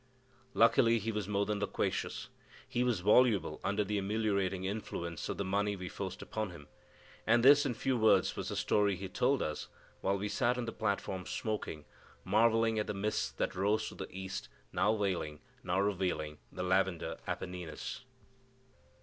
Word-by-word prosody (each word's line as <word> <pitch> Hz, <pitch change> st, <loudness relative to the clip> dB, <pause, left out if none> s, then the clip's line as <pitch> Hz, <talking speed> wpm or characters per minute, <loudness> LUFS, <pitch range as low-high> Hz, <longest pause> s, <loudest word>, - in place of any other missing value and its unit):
Luckily 115 Hz, 0 st, +5 dB
he 115 Hz, +1 st, -2 dB
was 105 Hz, -3 st, -3 dB
more 100 Hz, -1 st, +1 dB
than 105 Hz, 0 st, -1 dB
loquacious, 105 Hz, -, -2 dB, 0.4 s
he 125 Hz, -1 st, 0 dB
was 120 Hz, -7 st, +1 dB
voluble 105 Hz, +1 st, +4 dB
under 100 Hz, +1 st, +1 dB
the 105 Hz, +1 st, -1 dB
ameliorating 100 Hz, -2 st, 0 dB
influence 85 Hz, -4 st, -4 dB
of -, -, -2 dB
the 100 Hz, -, -2 dB
money 100 Hz, +2 st, +1 dB
we 90 Hz, -2 st, -6 dB
forced 95 Hz, 0 st, -5 dB
upon 110 Hz, -2 st, -3 dB
him; 85 Hz, -5 st, -11 dB, 0.6 s
and 120 Hz, +2 st, +4 dB
this, 145 Hz, +1 st, +8 dB
in 120 Hz, -, -2 dB
few 130 Hz, +3 st, 0 dB
words, 110 Hz, -2 st, +4 dB
was -, -, -4 dB
the -, -, -3 dB
story 100 Hz, -2 st, +2 dB
he 95 Hz, +2 st, -5 dB
told 125 Hz, +8 st, +1 dB
us 75 Hz, -1 st, -4 dB, 0.3 s
while 100 Hz, +1 st, +1 dB
we 100 Hz, +2 st, -2 dB
sat 120 Hz, +4 st, +1 dB
on 125 Hz, -, -2 dB
the 115 Hz, -, -3 dB
platform 100 Hz, -4 st, -2 dB
smoking, 100 Hz, -8 st, -3 dB, 0.4 s
marvelling 115 Hz, +2 st, +3 dB
at 105 Hz, -, -1 dB
the 105 Hz, -, -3 dB
mists 105 Hz, +2 st, 0 dB
that -, -, -1 dB
rose 100 Hz, +3 st, +1 dB
to -, -, -11 dB
the -, -, -6 dB
east, 95 Hz, -10 st, -6 dB, 0.2 s
now 105 Hz, +4 st, +3 dB
veiling, 90 Hz, -7 st, -1 dB, 0.2 s
now 90 Hz, +2 st, 0 dB
revealing 90 Hz, -6 st, -1 dB
the -, -, -4 dB
lavender 95 Hz, -1 st, +1 dB
Apennines. 90 Hz, -, -5 dB
100 Hz, 170 wpm, -33 LUFS, 95-110 Hz, 0.6 s, this